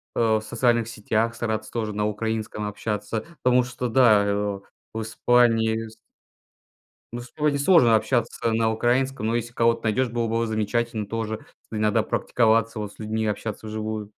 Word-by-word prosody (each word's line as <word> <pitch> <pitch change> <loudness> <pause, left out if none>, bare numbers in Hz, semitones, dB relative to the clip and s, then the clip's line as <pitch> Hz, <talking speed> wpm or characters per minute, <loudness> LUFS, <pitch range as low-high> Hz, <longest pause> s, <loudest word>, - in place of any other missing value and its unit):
э, - - -1 0.2
в - - -4
социальных 120 +1 +1
сетях 115 +1 -1
стараться 110 -2 -3
тоже 110 -3 -3
на 105 0 -1
украинском 110 0 -3
общаться, 105 +1 -4 0.2
потому 125 0 +4
что, 125 0 -4
да, 110 -5 +5
э, 100 - 0
и, - - +2
о, 100 -1 -2 0.3
в 110 - -3
Испании 115 -1 +2
с 110 - -14 1.2
Ну, 120 - -4
с 125 - -13
тобой 150 -1 +1
не 140 - -1
сложно 140 -7 +5
общаться 115 0 0
на 110 0 +2
украинском, 125 +2 0
но 115 - 0
если 120 0 -2
кого-то 115 0 +2
найдёшь, 115 +3 +1
было 115 -1 -1
бы 115 +1 0
замечательно 110 0 -1
тоже. 110 -1 -3 0.3
Иногда 105 -1 +1
практиковаться, 115 -1 +1
вот, 105 -1 -5
с - - -24
людьми, 110 +1 -2
общаться 110 +1 -4
вживую. 110 -1 -4
110 Hz, 175 wpm, -24 LUFS, 110-120 Hz, 1.2 s, да